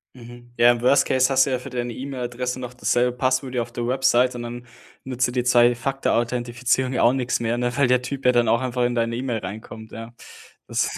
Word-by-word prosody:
Mhm. 120 Hz, 0 st, -13 dB
Ja, 120 Hz, +1 st, +6 dB
im 120 Hz, -1 st, -2 dB
Worst-Case 130 Hz, 0 st, +3 dB
hast 135 Hz, -1 st, +4 dB
du -, -, -3 dB
ja 130 Hz, -, 0 dB
für 125 Hz, -, -9 dB
deine 120 Hz, -1 st, -4 dB
E-Mail-Adresse 125 Hz, -1 st, -4 dB
noch 125 Hz, -1 st, -7 dB
dasselbe 125 Hz, 0 st, 0 dB
Passwort 130 Hz, +1 st, -1 dB
wie 125 Hz, -, 0 dB
auf 120 Hz, 0 st, -4 dB
der 120 Hz, 0 st, -4 dB
Website 130 Hz, -1 st, +2 dB
und 120 Hz, -, -5 dB
dann 120 Hz, +1 st, -7 dB, 0.4 s
nutzt 130 Hz, -1 st, -1 dB
dir -, -, -5 dB
die 125 Hz, 0 st, -1 dB
Zwei-Faktor-Authentifizierung 120 Hz, 0 st, +1 dB
ja -, -, +1 dB
auch 120 Hz, -, +5 dB
nix 130 Hz, -2 st, -1 dB
mehr, 120 Hz, 0 st, -1 dB
ne, 125 Hz, 0 st, -1 dB
weil 140 Hz, -2 st, +3 dB
der 125 Hz, 0 st, +3 dB
Typ 135 Hz, +1 st, -6 dB
ja 125 Hz, -, +6 dB
dann 120 Hz, -1 st, +2 dB
auch 115 Hz, +2 st, +2 dB
einfach 125 Hz, -1 st, -1 dB
in 120 Hz, 0 st, -1 dB
deine 115 Hz, 0 st, 0 dB
E-Mail 120 Hz, -2 st, -2 dB
reinkommt, 110 Hz, +3 st, -9 dB
ja. 115 Hz, +1 st, -9 dB, 0.5 s
Das -, -, 0 dB
125 Hz, 225 wpm, -23 LUFS, 120-130 Hz, 0.5 s, Ja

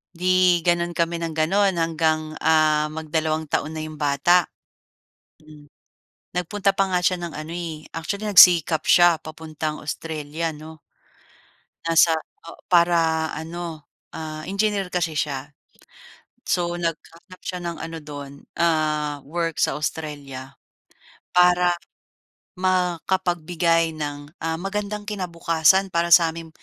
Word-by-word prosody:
'Di 180 Hz, 0 st, +3 dB
gano'n 175 Hz, 0 st, +2 dB
kami 170 Hz, 0 st, -1 dB
nang 165 Hz, -, -3 dB
gano'n 190 Hz, +6 st, +2 dB
hanggang 155 Hz, -1 st, 0 dB
ah 155 Hz, -1 st, +3 dB
magdalawang 155 Hz, 0 st, -2 dB
taon 155 Hz, -, -1 dB
na 160 Hz, -, -6 dB
'yong 155 Hz, 0 st, -6 dB
bata. 150 Hz, +4 st, +3 dB, 1.0 s
Hmm. 155 Hz, -2 st, -17 dB, 0.7 s
Nagpunta 195 Hz, +2 st, 0 dB
pa 195 Hz, -, +3 dB
nga 180 Hz, -, +2 dB
siya 180 Hz, +1 st, +2 dB
ng 175 Hz, -2 st, -6 dB
ano, 155 Hz, +2 st, -7 dB
eh, 165 Hz, -3 st, -6 dB
actually 200 Hz, +6 st, -3 dB
nagsikap 170 Hz, -5 st, +7 dB
siya 175 Hz, -1 st, +6 dB
papuntang 155 Hz, -1 st, -6 dB
Australia 160 Hz, +1 st, -4 dB
'no? 155 Hz, 0 st, -12 dB, 1.0 s
Nasa 165 Hz, 0 st, +4 dB, 0.3 s
oh -, -, -12 dB
para 165 Hz, -2 st, +3 dB
ano 165 Hz, -1 st, -6 dB, 0.3 s
ah 155 Hz, -1 st, -6 dB
engineer 200 Hz, -1 st, 0 dB
kasi 175 Hz, -3 st, -1 dB
siya. 145 Hz, -1 st, -3 dB, 0.9 s
So 175 Hz, -1 st, 0 dB
naghahanap 170 Hz, +2 st, -6 dB
siya 180 Hz, -, -4 dB
ng 170 Hz, -1 st, -4 dB
ano 165 Hz, 0 st, -6 dB
do'n 145 Hz, -2 st, -9 dB, 0.3 s
ah 155 Hz, -3 st, +1 dB
work 165 Hz, 0 st, -3 dB
sa 145 Hz, -, +2 dB
Australia 140 Hz, -3 st, -5 dB, 0.8 s
para 180 Hz, 0 st, +4 dB, 0.8 s
makapagbigay 175 Hz, -2 st, 0 dB
ng, 145 Hz, -1 st, -6 dB
ah, 160 Hz, 0 st, -2 dB
magandang 205 Hz, +3 st, -4 dB
kinabukasan 180 Hz, -1 st, +1 dB
para 170 Hz, 0 st, +1 dB
sa'ming 165 Hz, -1 st, +4 dB
165 Hz, 115 wpm, -23 LUFS, 155-175 Hz, 1.0 s, nagsikap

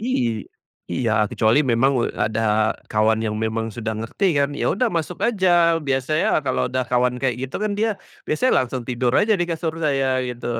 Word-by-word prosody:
Iy 120 Hz, -, -1 dB, 0.5 s
iya, 115 Hz, +3 st, 0 dB, 0.2 s
kecuali 110 Hz, +4 st, +2 dB
memang, 130 Hz, +4 st, +3 dB
eee, -, -, -6 dB
ada 110 Hz, 0 st, +1 dB, 0.2 s
kawan 110 Hz, +1 st, +2 dB
yang 105 Hz, 0 st, -2 dB
memang 110 Hz, +1 st, -2 dB
sudah 110 Hz, -2 st, -3 dB
ngerti 115 Hz, -, -2 dB
kan, 140 Hz, 0 st, +2 dB
ya -, -, 0 dB
udah 245 Hz, +4 st, +1 dB
masuk 165 Hz, -7 st, -3 dB
aja. 175 Hz, -6 st, +3 dB
Biasanya 140 Hz, +3 st, +1 dB
kalau 130 Hz, -, 0 dB
udah 130 Hz, 0 st, -1 dB
kawan 125 Hz, 0 st, +2 dB
kayak 130 Hz, -3 st, 0 dB
gitu, 130 Hz, -, -6 dB
kan 210 Hz, -1 st, -1 dB
dia 220 Hz, +1 st, +2 dB, 0.4 s
biasanya 255 Hz, +12 st, +1 dB
langsung 125 Hz, 0 st, -5 dB
tidur 125 Hz, 0 st, 0 dB
aja 215 Hz, 0 st, +3 dB
di -, -, +3 dB
kasur 160 Hz, -1 st, -2 dB
saya 135 Hz, -2 st, +1 dB, 0.2 s
gitu. 120 Hz, 0 st, -6 dB
130 Hz, 180 wpm, -22 LUFS, 115-165 Hz, 0.5 s, memang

